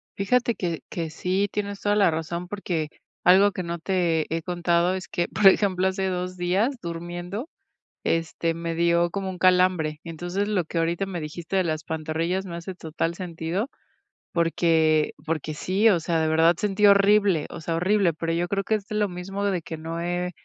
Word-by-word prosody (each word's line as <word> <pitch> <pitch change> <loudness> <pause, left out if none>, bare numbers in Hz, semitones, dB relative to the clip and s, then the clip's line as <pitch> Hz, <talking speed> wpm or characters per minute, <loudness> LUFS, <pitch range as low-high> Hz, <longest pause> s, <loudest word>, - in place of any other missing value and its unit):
Fíjate 235 +4 +1
que 170 -3 -2
que 165 -2 -3
sí, 185 +5 0
tienes 200 -1 -3
toda 205 0 +2
la 205 -3 +5
razón, 170 +2 -3
porque 175 -6 -3 0.3
algo 195 +3 +6
que 185 - -4
no 170 0 -4
te 170 -3 +1
he 165 - -2
contado 175 +1 +1
es 185 - -6
que, 175 - -1
por 210 - +4
ejemplo, 190 -1 +4
hace 190 0 -1
2 180 0 -3
días 190 +10 +1
durmiendo, 175 - -5 0.6
este, 165 0 0
me 165 0 -3
dio 170 0 +3
como 195 0 -3
un 185 -1 -6
calambre. 180 -4 +3
Entonces, 175 +4 -3
lo 205 -4 0
que 165 - -4
ahorita 170 +4 0
me 185 -3 -4
dijiste 165 +4 -5
de 190 - +3
las 155 -2 -2
pantorrillas 160 +4 -2
me 175 - -6
hace 170 +2 -6
total 165 0 -3
sentido, 175 - -3 0.6
porque 160 -2 +2
porque 155 -1 -2
sí, 195 +8 +2
o 180 -5 +3
sea, 165 0 0
de 160 - +1
verdad 165 +2 +4
sentí 210 0 +1
horrible, 200 -4 +5
o - - -8
sea, 165 +1 -2
horrible, 185 +1 +2
pero 165 +1 -3
yo 175 +1 0
creo 195 +2 -1
que 220 - +1
es 205 -2 -4
lo 210 -1 +1
mismo 195 +3 -4
de 190 -4 0
que 160 - -6
no 165 +1 -5
he, 175 +1 -2
175 Hz, 190 wpm, -25 LUFS, 165-195 Hz, 0.6 s, algo